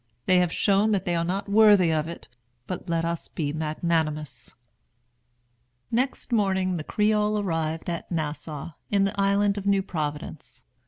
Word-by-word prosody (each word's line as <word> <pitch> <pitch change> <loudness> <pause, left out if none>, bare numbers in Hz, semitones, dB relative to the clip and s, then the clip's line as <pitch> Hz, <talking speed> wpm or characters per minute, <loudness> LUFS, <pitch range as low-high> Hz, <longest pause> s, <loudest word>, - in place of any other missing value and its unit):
They 185 -1 +4
have 180 -2 +1
shown 205 +3 +2
that 195 - 0
they 175 - 0
are 165 - +1
not 190 +4 -2
worthy 205 -4 +6
of 155 0 0
it; 170 - -8 0.4
but 180 +2 -6
let 165 0 0
us 170 0 -3
be 145 -3 -3
magnanimous." 155 -4 -2 1.4
Next 255 +2 -1
morning 190 -4 +1
the 155 - -4
Creole 210 +3 +1
arrived 165 -4 -2
at 170 0 -4
Nassau, 155 -1 -4 0.2
in 200 -1 +3
the 195 0 0
island 200 +1 +2
of 200 - -6
New 195 -1 +3
Providence. 150 -5 -5
180 Hz, 155 wpm, -26 LUFS, 160-200 Hz, 1.4 s, worthy